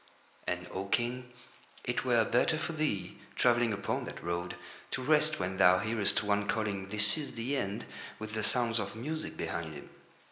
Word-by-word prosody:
And, 90 0 -2
O 95 +1 -3
King, 125 +3 -1 0.5
it 125 - -1
were 120 -3 +4
better 125 +6 +3
for 160 +1 -3
thee, 150 - -1 0.2
travelling 120 -1 +4
upon 100 -1 -1
that - - -8
road, 85 +1 -2 0.3
to 130 - -3
rest 155 +2 +4
when 95 0 -2
thou 90 -1 +7
hearest 110 +1 +1
one 105 0 +1
calling: 100 -3 -1
"This 105 +7 +2
is 145 - -5
the 120 +5 -1
End," 100 -6 -2 0.3
with 110 0 -6
the 110 - -1
sounds 115 0 +2
of - - -4
music 155 +7 -4
behind 80 -2 -3
him. 70 - -10
110 Hz, 175 wpm, -32 LUFS, 100-125 Hz, 0.5 s, thou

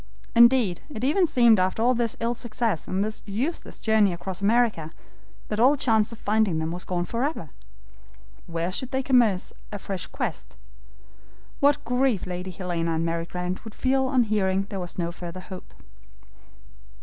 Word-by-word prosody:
Indeed, 235 -6 +5
it 245 -6 -7
even 335 +7 +3
seemed 235 -7 +5
after 220 +7 +2
this 235 -2 -1
ill 230 +1 0
success 230 -6 -2
and 190 +2 0
this 215 +1 -4
useless 250 - -3
journey 215 -4 +3
across 185 +2 -5
America, 210 -7 +2 0.6
that 210 - -2
all 260 +5 +6
chance 225 -5 +2
of 230 - -8
finding 210 -5 +1
them 160 +1 -2
was 175 +1 -5
gone 175 -1 -1
forever. 235 - -3 1.0
Where 170 +1 -2
could 255 +7 -3
they 265 0 -1
commence 235 -8 +2 0.2
a 205 - -4
fresh 195 -2 -5
quest? - - -5 1.0
What 285 +1 +3
grief 250 -3 +1
Lady 180 0 -5
Helena 170 -2 -2
and 165 +1 0
Mary 165 0 -2
Grant 180 +1 -4
would 220 -2 -10
feel 265 0 +1
on 255 -2 +3
hearing 195 -3 0
there 195 - -3
was 175 -1 -6
no 170 -1 -1
further 175 +1 -7
hope. 185 0 -10
210 Hz, 160 wpm, -25 LUFS, 180-240 Hz, 1.0 s, all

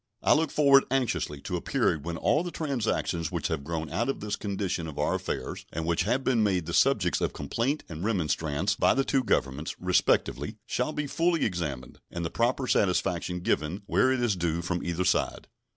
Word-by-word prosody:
I - - +6
look 160 +2 +2
forward 140 -2 +5
anxiously 120 - -1
to - - -3
a - - -5
period 75 - 0
when 85 -1 -3
all 150 - +2
the 175 - -4
transactions 115 - -1
which 85 -4 -2
have 80 -3 -2
grown 80 +1 -3
out 120 +4 0
of 135 - -2
this 105 0 -3
condition 95 -4 -3
of 75 - -8
our - - +1
affairs, 65 - -4
and 80 +1 -3
which 85 0 +1
have 135 +1 +1
been 125 -4 +2
made 95 -5 +1
the 85 - -5
subjects 100 -9 +3
of - - 0
complaint 115 - -2
and 80 0 -7
remonstrance 85 -3 0
by - - +3
the 135 - +2
two 135 -2 +1
Governments, 70 - -1
respectively, 90 0 +1
shall - - -1
be 150 - -2
fully 165 +3 +1
examined, 80 - -4
and 85 0 -4
the 80 - -3
proper 125 +3 +1
satisfaction 90 -4 +1
given 85 +4 -1
where 130 +5 +3
it 130 -2 0
is 110 -5 +2
due 85 -1 -1
from 90 0 -2
either 85 +1 -1
side. - - 0
90 Hz, 200 wpm, -28 LUFS, 80-125 Hz, -, I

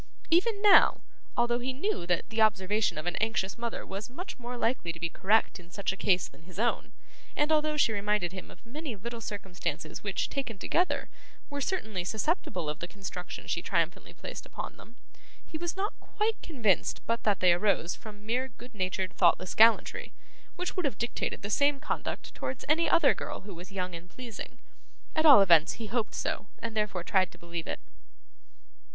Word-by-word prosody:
Even 400 +5 +3
now, 410 -2 +7 0.4
although 240 0 +2
he 260 +2 -2
knew 275 - -2
that 175 -2 +1
the 220 0 0
observation 210 -1 +2
of 155 - -4
an 175 - -1
anxious 215 -3 0
mother 235 -1 -4
was 200 +4 -6
much 340 +4 -7
more 245 0 -5
likely 230 -8 0
to 170 - -10
be 170 0 -1
correct 200 +4 +2
in 175 -1 -15
such 200 +2 -1
a - - -6
case 185 -2 +2
than - - -19
his 180 +2 -14
own, 235 +3 0 0.4
and 295 +1 +2
although 305 0 +2
she 230 -6 +4
reminded 205 -3 0
him 185 0 -8
of - - -16
many 280 +1 -5
little 230 +3 -6
circumstances 195 -4 -4
which, - - -1
taken 265 -6 -4
together, 355 - +1 0.4
were 285 0 -3
certainly 220 - -1
susceptible 220 - -1
of 150 0 -3
the 170 - -4
construction 190 -1 -7
she - - -1
triumphantly - - -1
put - - -7
upon - - -7
them, 230 - -15 0.5
he - - -10
was 345 +3 -3
not 400 +2 -1
quite 430 +1 -1
convinced 230 - +1
but 230 0 0
that 205 -2 +2
they 180 -2 +6
arose 180 -1 +1
from 210 -1 -11
mere 250 +4 0
good 245 +1 -14
natured 185 -1 -1
thoughtless 180 0 +3
gallantry, 225 +1 +4 0.4
which 360 0 -3
would 365 - 0
have 265 -8 -1
dictated 235 -1 -3
the 205 - -3
same 285 +3 +3
conduct - - -4
towards 260 0 -5
any 320 +3 +3
other 310 -6 +5
girl - - -5
who 200 0 -9
was 180 +3 -10
young 185 -2 -3
and 170 +1 -8
pleasing. 240 -2 -8 0.6
At 315 0 +4
all 275 -9 +10
events, 170 -5 +6
he 225 - -6
hoped 225 0 -1
so, - - -2
and 230 -1 -5
therefore 210 -5 0
tried 185 0 +2
to - - -15
believe 170 -1 -6
it. - - -3
220 Hz, 190 wpm, -30 LUFS, 185-265 Hz, 0.6 s, all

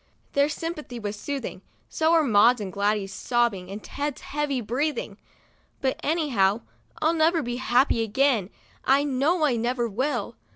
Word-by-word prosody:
Their 280 +1 +3
sympathy 305 -5 -5
was 210 -2 -4
soothing, 275 +6 -5 0.3
so 320 0 +1
were 330 -2 +5
Maud's 235 0 +5
and 195 -3 -5
Gladys' 200 -1 0
sobbing 235 -7 0
and 205 +2 -7
Ted's 290 -1 -4
heavy 290 -2 -2
breathing. 245 -2 -2 0.6
But, 265 -1 -1
any 315 0 0
how, 200 -2 +2 0.4
I'll 320 +2 +4
never 325 0 +2
be 240 0 -3
happy 255 -1 +2
again, 225 -2 +1 0.3
I 275 +2 +4
know 290 +4 +1
I 255 -5 +1
never 240 +1 0
will. 255 +8 -2
255 Hz, 155 wpm, -25 LUFS, 215-295 Hz, 0.6 s, were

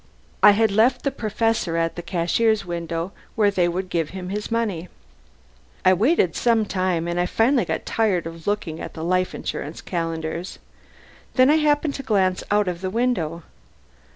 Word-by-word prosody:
I 210 - +8
had 220 -2 +3
left 240 +5 +3
the 275 - 0
Professor 220 -7 -1
at 165 0 0
the 175 - -5
cashier's 195 +5 +1
window, 170 0 -4 0.2
where 210 -2 +3
they 180 -3 +2
would 185 +2 -2
give 165 -4 -1
him 180 -1 -6
his 210 +2 -4
money. 210 -7 -2 1.0
I 185 - +7
waited 205 - +2
some 230 -2 +2
time, 185 -4 -1
and 175 +1 0
finally 245 +3 +3
I - - -2
got - - -3
tired 205 -7 +1
of 165 +1 -9
looking 195 -6 -2
at - - -7
the 160 - -5
Life 185 +2 0
Insurance 150 +3 -5
calendars. 165 0 -4 0.8
Then 255 +2 +6
I 310 - +5
happened 295 -1 +2
to 275 - -5
glance 195 -7 +1
out 205 -1 +2
of 175 -1 -3
the 190 - -2
window. 185 -8 -1
185 Hz, 175 wpm, -23 LUFS, 170-225 Hz, 1.0 s, I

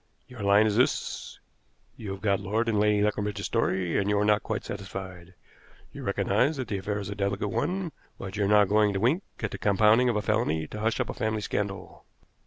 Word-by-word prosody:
Your 125 -3 -10
line 100 +2 +5
is 105 -1 +1
this: 125 - -1 0.6
You 105 - -8
have 95 - -9
got 100 -2 +2
Lord 105 +4 -1
and 110 -2 +1
Lady 105 0 +3
Leconbridge's 105 -1 -1
story, 95 -6 0
and 100 0 0
you 105 - +2
are 105 - +2
not 105 0 +3
quite 110 -3 -4
satisfied. 95 -3 -7 0.6
You - - -8
recognize 145 +4 +1
that 130 -4 -4
the 100 - -2
affair 100 +2 -3
is 100 -1 -5
a - - -4
delicate 100 0 -1
one, 180 +2 -2 0.3
but 95 +1 -7
you 105 -1 +1
are - - +1
not 105 0 +5
going 105 +1 +3
to 95 - -1
wink 130 - +2 0.2
at 110 - -2
the - - -6
compounding 105 +5 +4
of 120 - 0
a 105 - 0
felony 105 -9 0
to 105 - -7
hush 110 +1 0
up - - -1
a - - -7
family 110 -1 -2
scandal." 100 -1 -4
105 Hz, 220 wpm, -27 LUFS, 100-110 Hz, 0.6 s, line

